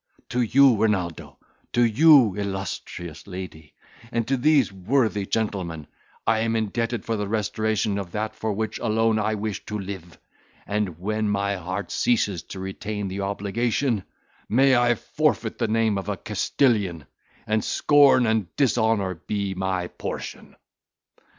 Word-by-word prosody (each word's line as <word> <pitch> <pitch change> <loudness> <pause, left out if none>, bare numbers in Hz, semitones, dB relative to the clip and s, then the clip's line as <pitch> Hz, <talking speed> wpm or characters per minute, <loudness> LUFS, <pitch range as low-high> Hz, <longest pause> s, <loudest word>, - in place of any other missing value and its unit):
To 125 - 0
you, 130 +1 +5
Renaldo, 95 -7 -1 0.4
to 120 - +4
you 130 - +6
illustrious 95 -4 -5
lady, 90 -5 -8 0.4
and 115 -2 -1
to 135 - +2
these 135 -3 +3
worthy 105 0 0
gentlemen, 95 -8 -2 0.4
am 115 0 +1
I - - +3
indebted 115 +1 -2
for 115 - -1
the 105 -1 -2
restoration 110 -1 0
of 95 -3 -6
that 110 +1 -2
for 110 0 -2
which 110 +1 -3
alone 110 -1 +1
I 110 +1 0
wish 105 -1 -4
to 105 - -3
live; 95 -4 -7 0.5
and 100 -5 -2
when 105 +3 -1
my 100 0 0
heart 95 +3 -5
ceases 100 -7 +1
to 95 - -8
retain 100 +1 -4
the 95 +2 -4
obligation, 110 +3 -1 0.5
may 135 +3 +5
I 120 0 +3
forfeit 150 -4 -1
the 115 - +1
name 110 -2 +1
of 95 - -6
a - - -2
Castilian, 100 - 0 0.4
and 110 -1 0
scorn 140 -4 +5
and 110 -4 +1
dishonour 110 -7 +2
be 100 -2 -1
my 95 -1 -1
portion." - - -7
105 Hz, 145 wpm, -24 LUFS, 95-115 Hz, 0.5 s, you